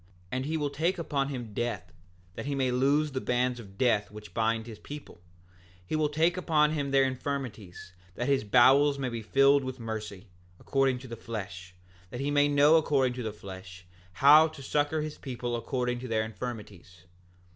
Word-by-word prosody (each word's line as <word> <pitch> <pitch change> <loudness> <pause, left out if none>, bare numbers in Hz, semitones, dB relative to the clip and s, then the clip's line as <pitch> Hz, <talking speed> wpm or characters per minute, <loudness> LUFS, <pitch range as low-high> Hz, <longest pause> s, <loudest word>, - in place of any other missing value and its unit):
7:12 90 - -29 0.2
And 130 +1 -2
he 160 +1 -1
will 145 -2 -1
take 170 +6 0
upon 140 -5 -1
him 120 -6 -6
death, 100 -8 -3 0.4
that 135 - -6
he 145 - -1
may 130 -2 +1
loose 140 +4 +2
the 130 -1 -3
bands 125 0 0
of 100 -4 -13
death 110 -5 +2
which 105 0 -12
bind 115 0 0
his 115 -3 -10
people; 145 -9 -10 0.2
and 90 0 -29 0.3
he 90 - -3
will 155 -1 +1
take 165 +4 +1
upon 155 -4 +2
him 145 -3 -2
their 135 0 +4
infirmities, 125 -9 -5 0.2
that 120 - -3
his 140 -4 +2
bowels 135 +6 +5
may 130 -2 -2
be 115 -1 -5
filled 135 +5 +4
with 130 0 -6
mercy, 110 -3 -6 0.3
according 135 -2 +1
to 130 +1 -10
the 115 - -6
flesh, 95 -5 -7 0.3
that 120 - -7
he 140 +1 -1
may 145 0 +4
know 145 +2 +5
according 135 -5 +2
to 125 - -6
the 110 -2 -3
flesh 95 -3 -11 0.3
how 150 - +7
to 155 -3 -11
succor 150 +2 0
his 155 -1 -7
people 125 -2 -4
according 125 +1 -2
to 130 - -7
their 110 -2 0
infirmities. 105 -5 -8
125 Hz, 195 wpm, -29 LUFS, 110-145 Hz, 0.4 s, how